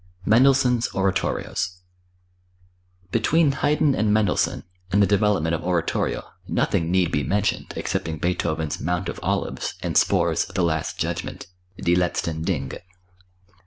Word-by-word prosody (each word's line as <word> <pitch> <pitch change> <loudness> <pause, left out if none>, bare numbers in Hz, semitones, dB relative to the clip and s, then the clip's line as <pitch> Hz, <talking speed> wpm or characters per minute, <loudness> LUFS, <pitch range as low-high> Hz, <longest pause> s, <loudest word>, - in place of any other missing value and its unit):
Mendelssohn's 125 +1 +4
Oratorios. 95 -1 -1 1.3
Between 145 - +3
Haydn 145 +1 +2
and 105 -3 +1
Mendelssohn, 105 -3 +1 0.3
in 100 - +3
the 100 - +6
development 100 -5 +2
of 85 - -2
oratorio, 90 -2 0 0.2
nothing 80 -1 0
need 90 -1 +2
be 75 - 0
mentioned, 100 +7 -1
excepting 80 -1 -2
Beethoven's 80 -2 -1
"Mount 90 +3 -1
of - - -6
Olives" - - -2
and - - -2
Spohr's - - +3
"The 90 - -2
Last 80 -2 -1
Judgment" - - -3 0.3
(Die 85 - +1
Letzten 85 -2 0
Dinge). 70 -7 -2
95 Hz, 125 wpm, -23 LUFS, 85-110 Hz, 1.3 s, the